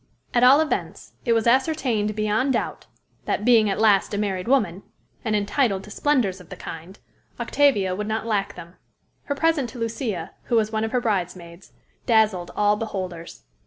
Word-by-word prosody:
At 240 - +3
all 270 +4 +7
events, 315 - -3
it 235 - +3
was 225 -1 +1
ascertained 240 -5 +1
beyond 215 +5 +1
doubt, - - -3 0.4
that, 210 - -1
being 230 -4 +5
at 195 - -1
last 210 -2 +3
a - - -2
married 195 -2 -2
woman, 205 -9 +1 0.4
and 215 -1 0
entitled 205 -1 0
to 210 - -12
splendors 220 -9 0
of 175 - -17
the - - -7
kind, 170 +5 -9 0.4
Octavia 210 -11 +2
would 210 +2 -4
not 220 0 -2
lack 205 -3 -1
them. 170 +1 -12 0.5
Her 285 - -2
present 305 -4 +1
to 255 - -11
Lucia, 225 - -3
who 240 - 0
was 220 -1 +2
one 220 0 -1
of 225 - -2
her 250 - +1
bridesmaids, 180 -4 -4 0.3
dazzled 215 -7 +2
all 210 0 +2
beholders. 185 - -6
215 Hz, 175 wpm, -23 LUFS, 195-240 Hz, 0.5 s, all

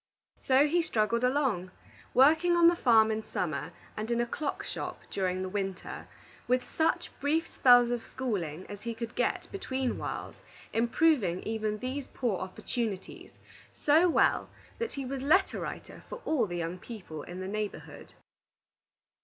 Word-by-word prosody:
So 270 +2 +6
he 345 +4 +2
struggled 235 -5 0
along, 250 -9 +1 0.5
working 315 +7 +5
on 340 -1 +7
the 345 - +1
farm 225 -7 +5
in 220 0 -1
summer 160 -6 -3 0.2
and 215 +2 -4
in 235 0 +1
a 240 - +2
clock 280 +4 -3
shop - - -5
during 185 -1 -1
the - - -3
winter, 195 -2 -4 0.4
with 250 0 +2
such 320 0 +1
brief 310 +4 +1
spells 245 -4 +5
of 240 -1 -1
schooling 185 - -4
as 205 -1 -8
he 230 0 -4
could 230 0 -5
get - - 0
between 265 -10 -2
whiles, - - -5 0.4
improving 230 - +2
even 215 -1 -2
these 260 +4 -4
poor 230 -7 -2
opportunities 195 +1 -5 0.4
so 320 +5 +4
well - - +3 0.3
that 465 -1 -2
he 275 -1 -4
was 265 +1 -4
letter 365 +8 +3
writer - - -7
for - - -6
all 270 -9 +2
the 175 -1 -4
young 170 +2 -3
people 180 -9 -8
in 175 +4 -8
the 185 - -4
neighborhood. 210 +1 -5
235 Hz, 155 wpm, -30 LUFS, 195-280 Hz, 0.5 s, on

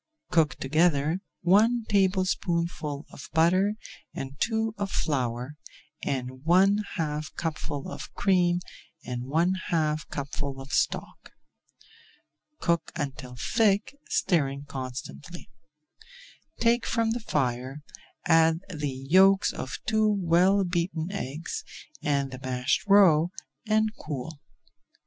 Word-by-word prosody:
Cook 160 -4 +3
together 155 +3 +2 0.2
one 220 +6 +4
tablespoonful 175 -6 0
of 135 - -10
butter 185 +6 +3 0.4
and 135 +1 -6
two 220 -1 0
of 200 -1 -1
flour, 130 -3 -2 0.5
and 130 -2 -2
add 130 - -14
one 190 +5 +4 0.2
half 150 -2 -2
cupful 150 -3 -4
of - - -7
cream 180 -2 +2 0.4
and 125 0 -4
one 165 +7 +2
half 155 -2 0
cupful 140 -1 -4
of 135 +2 -9
stock. - - -1 1.3
Cook 170 -2 0
until 135 -5 -5
thick, 210 - +1
stirring 140 -6 +1
constantly. 135 +6 -7 1.1
Take 235 +1 +2
from 230 -2 +1
the 235 - -1
fire, 135 - -2 0.4
add 165 0 +4
the 150 -2 -2 0.2
yolks 190 +4 +5
of 130 - -5
two 220 0 +2
well 190 0 +3
beaten 175 -1 -2
eggs, 165 -4 -4 0.4
and 140 -2 0
the 130 - -7
mashed 130 +6 -1
roe, 180 -5 +6 0.4
and 215 0 +2
cool. 150 +1 -6
165 Hz, 110 wpm, -27 LUFS, 140-190 Hz, 1.3 s, roe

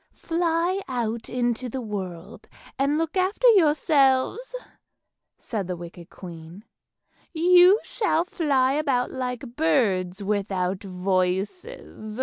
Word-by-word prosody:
" - - -46 0.2
Fly 340 +3 0
out 235 -3 -3
into 245 0 -1
the 265 - -4
world 195 -4 -7 0.3
and 280 +2 +2
look 325 +1 -2
after 380 +6 +2
yourselves," 305 - +3 0.8
said 205 -6 -4
the 180 - -3
wicked 170 0 -11
queen; 170 +3 -11 0.7
"you 360 +4 +6
shall 420 -7 0
fly 275 -7 +1
about 275 -4 0
like 250 -1 -5
birds 200 - +1
without 195 -2 -1
voices." 190 - -3
250 Hz, 110 wpm, -24 LUFS, 195-320 Hz, 0.8 s, you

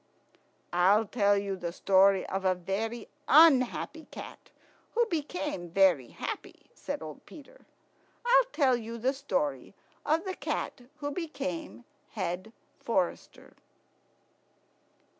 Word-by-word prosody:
"I'll 195 +5 +4
tell 205 -2 +2
you 200 -1 -2
the 175 -2 -4
story 190 +1 +4
of 195 0 -3
a 185 -1 +3
very 205 +6 -3 0.2
unhappy 310 +1 +4
cat - - -10 0.5
who 475 +1 +4
became 295 - -3
very 175 -8 +4
happy," - - -7
said - - -5
old 155 -2 -9
Peter. 325 - -15 0.6
"I'll - - +5
tell 270 - +3
you 230 0 -6
the 255 +4 0
story 150 - -2 0.3
of 325 +5 +1
the 380 - -2
Cat - - -3 0.2
who 290 0 -2
became 305 -4 -5 0.3
Head 185 +1 -3 0.3
forester." 185 -6 -2
225 Hz, 115 wpm, -29 LUFS, 190-290 Hz, 0.6 s, I'll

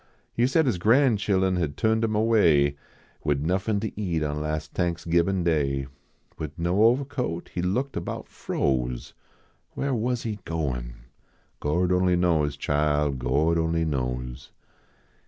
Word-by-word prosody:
He 120 +1 +2
said 160 +4 +3
his 120 -9 0
gran 120 +5 +4
chilun 95 -2 +1
had 75 -5 -2
turned 110 0 +2
him 110 -1 0
away, 85 -11 +4 0.5
Wid 75 -2 0
iiuffin 95 +5 0
to 105 -1 -4
eat 85 -6 -1
on 75 0 -2
las 75 0 -2
Thanksgibin 85 +2 0
Day. 70 -5 +1 0.5
Wid 75 -2 -5
no 85 +2 0
ovahcoat, 125 - -3
He 90 - -3
looked 125 +10 -1
about - - -4
froze. 60 -2 -2 0.6
Whar 140 0 -1
was 120 +1 -1
he 105 -2 -4
goin? 65 -8 -3 0.6
Gord 90 +5 +1
only 90 0 +3
knows, 80 -5 +1
chile, 75 0 +1
Gord 70 +6 +1
only 80 0 +1
knows. 60 -3 -3
85 Hz, 135 wpm, -26 LUFS, 75-105 Hz, 0.6 s, gran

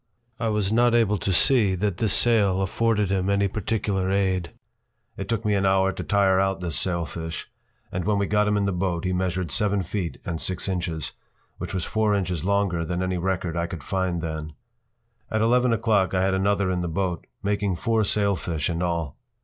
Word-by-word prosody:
I 115 - -1
was 105 -1 0
not 120 +1 +4
able 105 -4 +2
to 95 - -1
see 105 0 +4
that 100 -1 -1
this 110 -1 +1
sail 100 -5 +4
afforded 105 0 +1
him 95 0 0
any 100 0 +2
particular 100 -1 -1
aid. 95 -3 0 0.7
It 95 - -6
took 115 -1 -1
me 105 - +2
an 100 -1 +1
hour 95 0 +3
to - - -6
tire 95 -2 +3
out 95 0 +1
this 85 -5 -3
sailfish, 85 0 -2 0.4
and 95 - -2
when 105 +3 +1
we 100 - +1
got 105 +1 +2
him 105 0 +2
in 100 - +1
the 100 - +1
boat 90 -1 -2
he 90 - 0
measured 90 -2 -1
seven 100 +1 +1
feet 90 -1 -4
and 85 -5 -3
six 95 0 -1
inches, 85 -5 -2 0.5
which - - -5
was 90 - -2
four 110 -1 +1
inches 90 -5 -2
longer 100 -3 +1
than 90 +2 -2
any 90 -1 -1
record 90 -2 -2
I 85 0 -1
could 85 -4 -7
find 90 -2 -1
then. 80 -1 -5 0.8
At 110 - 0
eleven 125 +2 +3
o’clock 105 -5 +2
I 95 - +2
had 95 0 +2
another 100 0 +1
in 90 -1 -1
the 85 - -2
boat, 90 0 -2 0.2
making 100 -2 0
four 110 +4 +1
sailfish 95 -6 0
in 85 +1 -3
all. 85 -4 -2
95 Hz, 200 wpm, -24 LUFS, 90-105 Hz, 0.8 s, not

